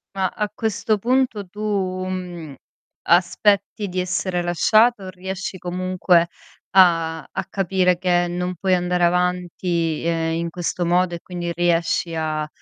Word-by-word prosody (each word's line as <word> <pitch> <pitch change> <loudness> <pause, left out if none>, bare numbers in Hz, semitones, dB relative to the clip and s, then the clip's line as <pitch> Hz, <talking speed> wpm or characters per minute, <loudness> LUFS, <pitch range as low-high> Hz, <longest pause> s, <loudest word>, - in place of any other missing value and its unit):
Ma, 190 -1 +1
a 210 +2 -3
questo 220 0 0
punto 245 -1 0
tu, 205 +4 -14 0.5
mhmm, 175 -5 -6 0.5
aspetti 200 +4 +2
di 185 0 -3
essere 180 0 -1
lasciato, 215 +6 +3
o 190 - -6
riesci 190 +1 -5
comunque 180 -1 +1 0.4
a 165 -3 +4
a - - -4
capire 185 -2 +1
che 175 -1 +1
non 180 +1 -3
puoi 185 +2 0
andare 180 0 +1
avanti, 175 -2 0
ehm, 165 -1 0
in 170 +1 -2
questo 175 +1 -3
modo 175 +1 +2
e - - -7
quindi 175 -1 -5
riesci 170 0 +1
a 155 -1 -2
180 Hz, 140 wpm, -22 LUFS, 170-190 Hz, 0.5 s, a